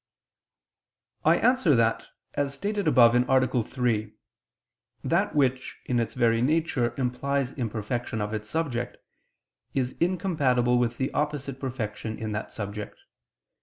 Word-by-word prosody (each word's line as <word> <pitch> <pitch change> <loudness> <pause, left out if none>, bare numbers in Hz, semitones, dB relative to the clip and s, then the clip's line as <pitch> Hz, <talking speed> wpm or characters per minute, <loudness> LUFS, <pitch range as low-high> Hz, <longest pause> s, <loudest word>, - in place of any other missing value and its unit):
I - - +5
answer 250 - +3
that, 115 -1 +1 0.3
As 140 -1 -1
stated 205 +2 -2
above 120 -6 +6
(A. 125 0 +3
3), 110 -3 -1 0.9
that - - +1
which, 130 -3 +1
in 125 -1 +1
its 115 -2 -2
very 115 -2 +3
nature, 145 -3 +1
implies 135 +1 -1
imperfection 115 -1 -3
of 105 +1 -2
its 105 0 -4
subject, 145 -7 -2 0.8
is 130 -2 -1
incompatible 145 -9 +2
with 120 -1 0
the 130 - -2
opposite 145 -3 -2
perfection 110 -4 -4
in 110 -1 -4
that 105 +1 -4
subject. 105 0 -6
125 Hz, 125 wpm, -27 LUFS, 115-140 Hz, 0.9 s, above